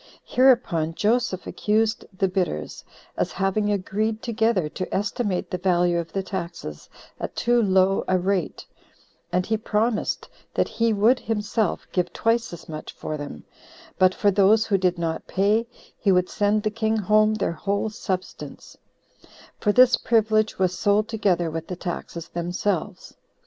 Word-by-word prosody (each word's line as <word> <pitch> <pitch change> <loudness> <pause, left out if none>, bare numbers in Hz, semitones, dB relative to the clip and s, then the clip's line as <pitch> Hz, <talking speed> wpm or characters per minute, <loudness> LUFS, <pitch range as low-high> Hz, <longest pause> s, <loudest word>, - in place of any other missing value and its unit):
Hereupon 235 -12 +3
Joseph 215 -3 0
accused 215 +1 0
the 195 0 0
bidders, 180 - -3 0.3
as - - -1
having 205 +2 0
agreed 215 +3 -1
together 225 -7 +1
to 185 +4 -6
estimate 200 -1 -1
the 180 - -2
value 175 -1 +2
of 165 -1 -5
the 195 - -2
taxes 170 - -6 0.3
at - - -5
too 240 0 +2
low 190 -1 +3
a 185 - +3
rate; 185 -1 -1 0.7
and 180 0 +1
he 220 +1 0
promised 215 +1 -1 0.3
that - - +2
he 230 0 0
would 220 +5 +3
himself 220 -1 -1
give 180 -2 0
twice 230 +4 0
as 170 -2 -10
much 155 -1 -7
for 155 - -5
them: 145 - -7 0.6
but 185 0 +4
for 205 - +3
those 205 +3 +4
who 205 - +1
did 180 -1 +1
not 165 -1 -3
pay, 210 +4 +1 0.3
he 200 - +2
would 180 -1 +2
send 210 +1 +1
the 215 - 0
king 220 0 0
home 215 +1 +3
their 205 - -1
whole 200 +5 -2
substance; 185 -3 -6 0.8
for 210 - +2
this 250 +3 +6
privilege 220 -1 +2
was 185 -1 +1
sold 205 +1 +2
together 180 -7 +1
with 165 0 -5
the 180 - -4
taxes 170 -1 -6
themselves. 180 +2 -3
200 Hz, 155 wpm, -24 LUFS, 180-220 Hz, 0.8 s, this